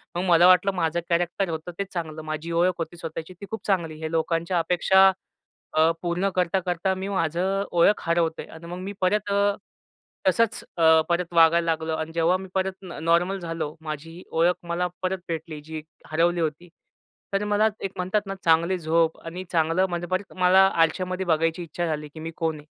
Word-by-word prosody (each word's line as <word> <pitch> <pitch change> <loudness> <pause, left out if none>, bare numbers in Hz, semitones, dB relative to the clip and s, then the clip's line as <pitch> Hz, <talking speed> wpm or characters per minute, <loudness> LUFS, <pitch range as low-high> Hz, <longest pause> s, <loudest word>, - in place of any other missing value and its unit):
मग 175 - -1
मला 175 +1 +7
वाटलं 185 +2 +5
माझं 170 -1 0
कॅरेक्टर 175 +2 0
होतं 160 +2 -5
तेच 195 -1 -3
चांगलं 160 -3 -4
माझी 155 +2 -5
ओळख 175 +2 +3
होती 165 +1 -5
स्वतःची 165 +1 -7
ती - - -6
खूप 220 - -6
चांगली. 170 -5 0
हे 160 0 -4
लोकांच्या 165 +2 0
अपेक्षा 190 +3 +4 0.7
अ, 160 +1 +5
पूर्ण 180 +3 0
करता-करता 180 +1 0
मी 190 +1 -4
माझं 185 +2 0
ओळख 175 +4 +4
हरवतोय. 170 -1 0
आणि 160 +1 -12
मग 175 +1 -6
मी 195 +2 -5
परत 205 +2 +1
अ, 200 0 +2 0.7
तसंच 225 +4 +2
अ, 160 -1 +6
परत 175 0 -1
वागायला 165 0 +5
लागलो. 160 -1 -1
आणि 160 +1 -4
जेव्हा 170 +3 +3
मी 190 0 -9
परत 190 0 0
न 175 -5 -8
नॉर्मल 175 +4 +2
झालो. 165 -2 -4
माझी 160 +3 -7
ओळख 170 +2 +3
मला 175 +1 0 0.2
परत 185 0 -1
भेटली, 160 -2 -5
जी 160 +1 -7 0.3
हरवली 170 +2 +2
होती. 160 +2 -3 0.6
तर 200 +1 +1
मला 210 +1 +3 0.2
एक 195 - -2
म्हणतात 185 +3 0
ना, 195 - -4
चांगली 170 +3 +3
झोप 165 0 +1
आणि 180 +3 -6
चांगलं 165 +2 +2
म्हणजे 175 0 -3
परत 185 +2 -3
मला 185 +1 +6 0.2
आरश्यामध्ये 185 +3 -1
बघायची 165 +1 +1
इच्छा 175 +1 -4
झाली 150 -1 -3
की 160 - -10
मी 165 +1 -5
कोण 160 -1 -1
आहे. 150 - -15
170 Hz, 185 wpm, -25 LUFS, 165-185 Hz, 0.7 s, मला